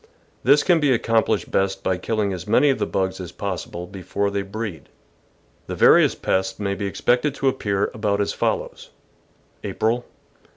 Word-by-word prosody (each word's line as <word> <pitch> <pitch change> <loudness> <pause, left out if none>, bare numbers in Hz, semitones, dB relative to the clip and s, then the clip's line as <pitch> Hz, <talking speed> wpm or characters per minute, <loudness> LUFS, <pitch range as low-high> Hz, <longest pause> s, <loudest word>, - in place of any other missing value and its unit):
This 140 +3 +5
can 175 -3 +4
be 145 -3 +2
accomplished 115 -2 +1
best 95 0 0
by 95 - 0
killing 105 0 -1
as 90 0 -7
many 145 +7 +4
of 135 - -2
the - - 0
bugs 95 0 -1
as 90 -2 -7
possible 90 -3 -5
before 100 +2 -3
they 100 0 -1
breed. 100 -6 -6 0.8
The - - -4
various - - +5
pests 95 0 -1
may 100 -1 -1
be 100 +1 -3
expected 125 +7 +1
to 135 - -1
appear 105 -6 0
about 105 -2 -1
as 100 - 0
follows: - - -2 0.7
April. 120 +2 0
100 Hz, 165 wpm, -22 LUFS, 95-115 Hz, 0.8 s, This